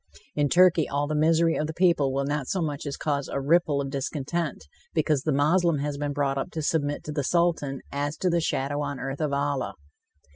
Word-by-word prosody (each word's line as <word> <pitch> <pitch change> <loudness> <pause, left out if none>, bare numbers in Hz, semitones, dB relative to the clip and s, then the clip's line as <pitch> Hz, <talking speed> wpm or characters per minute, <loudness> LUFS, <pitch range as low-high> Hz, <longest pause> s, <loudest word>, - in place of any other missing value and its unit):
In 145 -1 +1
Turkey, 175 -2 +5
all 145 +1 0
the 150 - -3
misery 165 +2 +3
of 150 - -1
the 160 - -6
people 170 -7 +3
will 135 +1 -1
not 145 -2 -2
so 190 - -1
much 150 -3 -3
as 140 - -4
cause 140 -2 -1
a - - -2
ripple 150 0 +2
of 135 -1 -3
discontent, 145 - -3 0.3
because 150 -4 +2
the 155 - 0
Moslem 155 +4 +3
has 140 0 -3
been 145 0 -1
brought 140 -1 0
up - - -3
to 160 - -3
submit 145 -1 0
to 150 - -5
the 145 -1 -1
Sultan 160 -4 +1
as 145 +2 -2
to 185 - -1
the 170 0 +2
shadow 145 -1 -1
on 140 -2 -3
earth 135 +2 -4
of 150 -2 0
Allah. 140 -7 -1
145 Hz, 220 wpm, -26 LUFS, 140-160 Hz, 0.3 s, Turkey